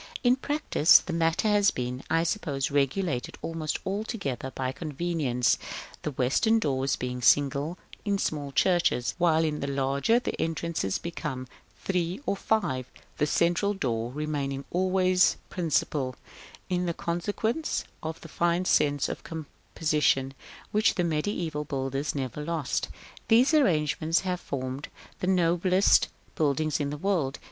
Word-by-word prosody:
In 245 0 +5
practice 270 - +4
the 175 - -4
matter 165 +5 +1
has 205 -1 +4
been, 125 +1 -4
I 165 0 +3
suppose, 155 -8 -1
regulated 140 0 0
almost 165 -2 -2
altogether 195 - -3
by 130 -1 -3
convenience, 150 -5 0 0.4
the - - -2
western 140 - +2
doors 135 -8 0
being 125 0 -4
single 145 +6 +3 0.3
in 205 -1 +1
small 145 -6 -2
churches, 170 -5 +2
while 165 -2 +4
in 150 -2 -1
the 140 - -3
larger 140 - +2
the 245 - -2
entrances 165 - -1
become 150 -6 -5 0.4
three 180 0 -1
or - - 0
five, 160 - -1 0.3
the 150 - +2
central 175 +6 +2
door 120 -8 -2
remaining 140 -2 -3
always 185 0 +3
principal, 150 -6 0 0.5
in 180 -2 0
consequence 205 - -2 0.2
of 160 0 -5
the - - -9
fine 175 +2 0
sense 145 -4 +2
of - - -5
composition 150 -3 -1 0.4
which 215 +1 +3
the 180 - +1
mediæval 160 -2 -2
builders 135 +1 -2
never 135 +1 -3
lost. 160 -4 -2 0.4
These 245 +7 +5
arrangements 160 - +2
have 180 -2 -2
formed 130 -1 -4 0.3
the 180 - -2
noblest 180 +1 +4 0.3
buildings 155 0 +1
in 145 -1 -1
the 150 - -4
world. 160 -6 0
160 Hz, 135 wpm, -27 LUFS, 140-180 Hz, 0.5 s, In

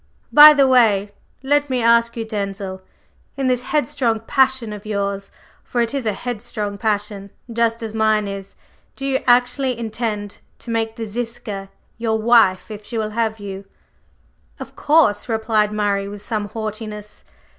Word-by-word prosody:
By 300 0 +10
the 275 -2 +4
way, 215 -6 +3 0.3
let 290 +1 +2
me 255 -1 0
ask 235 0 +3
you, 225 - -3
Denzil, 195 -3 -4 0.6
in 270 - -1
this 250 -1 +1
headstrong 245 -5 0
passion 260 -2 +1
of 205 -1 -9
yours, 200 -2 -3 0.3
for 245 - -3
it 235 +2 0
is 270 -5 -2
a 215 - +1
headstrong 215 -3 -5
passion, 205 -2 -2 0.2
just 230 0 0
as 220 -1 -5
mine 215 -1 +2
is, 195 0 -7 0.4
do 270 - -6
you 270 -1 0
actually 250 +1 +3
intend 220 -3 -4 0.2
to 235 - -8
make 225 -1 -1
the 225 - -5
Ziska 215 -3 -5 0.3
your 225 -1 0
wife 220 -4 +3
if 210 0 -8
she 230 +2 -6
will 215 -1 -2
have 220 0 -1
you?" 195 -1 -7 0.9
"Of - - -9
course," 290 -9 +3
replied 220 -2 +1
Murray, 205 -2 0
with 205 0 -8
some 210 -2 -3
haughtiness. 215 -1 -6
220 Hz, 155 wpm, -20 LUFS, 205-240 Hz, 0.9 s, By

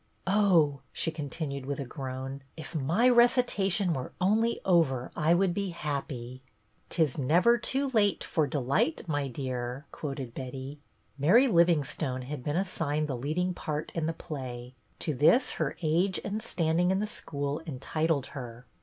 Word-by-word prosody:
" - - -40
Oh," 185 -8 +4
she 165 - -1
continued 145 -3 -5
with 140 0 -3
a 140 - -3
groan, 130 +1 -6
" - - -39
if 160 - -8
my 165 - +2
recitation 235 -7 +4
were 130 -4 -5
only 220 +5 +2
over 150 -9 +2
I 165 +2 +3
would 185 0 +2
be 200 +1 -2
happy." 135 -6 -4 0.2
'' 110 - -41
' - - -39
'T 165 - +2
is 145 -5 -2
never 175 - +4
too 270 +5 -1
late 205 -6 +2
for 155 -3 0
delight, 140 +3 0
my 145 -3 -1
dear,' 125 +1 -4
" - - -38
quoted 135 -5 -5
Betty. 130 +3 -6 0.4
Mary 215 - +6
Livingstone 160 - +2
had 140 0 -6
been 150 +4 -1
assigned 155 -5 -1
the 135 - -2
leading 155 +9 -1
part 155 -2 -4
in 160 -2 -1
the - - +1
play; 125 -6 -7 0.2
to 155 - -2
this 155 - +4
her - - -1
age 175 +4 +2
and 210 +2 -3
standing 170 -3 +1
in 190 - +2
the 210 - 0
school 145 -8 -4
entitled 155 +1 -1
her. 125 -3 -8
155 Hz, 170 wpm, -29 LUFS, 135-180 Hz, 0.4 s, Mary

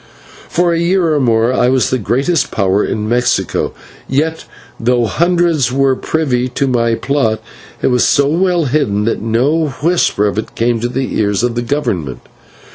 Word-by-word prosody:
For 175 0 +1
a 165 - 0
year 170 -1 +1
or 150 - +1
more 115 -1 +2
I 125 -1 +2
was 130 -1 +1
the 130 - 0
greatest 135 - 0
power 100 0 +1
in 105 -1 -2
Mexico, 120 -5 0 0.3
and 135 - -2
yet, 160 +2 -1 0.3
though 120 0 +1
hundreds 170 -2 +1
were 135 0 +2
privy 130 -5 -1
to 130 +3 -1
my 115 -3 +1
plot, 115 -5 0 0.4
it - - +3
was 125 -1 +2
so 140 - +3
well 175 +1 +1
hidden 120 -7 0
that 115 - -1
no 130 +9 +1 0.2
whisper 165 - +2
of 105 +1 -1
it 110 - -7
came 115 0 0
to 120 +2 -2
the 130 +1 -3
ears 105 +1 0
of 120 -1 0
the 120 - -2
Government. 115 - -3
125 Hz, 180 wpm, -15 LUFS, 115-155 Hz, 0.4 s, it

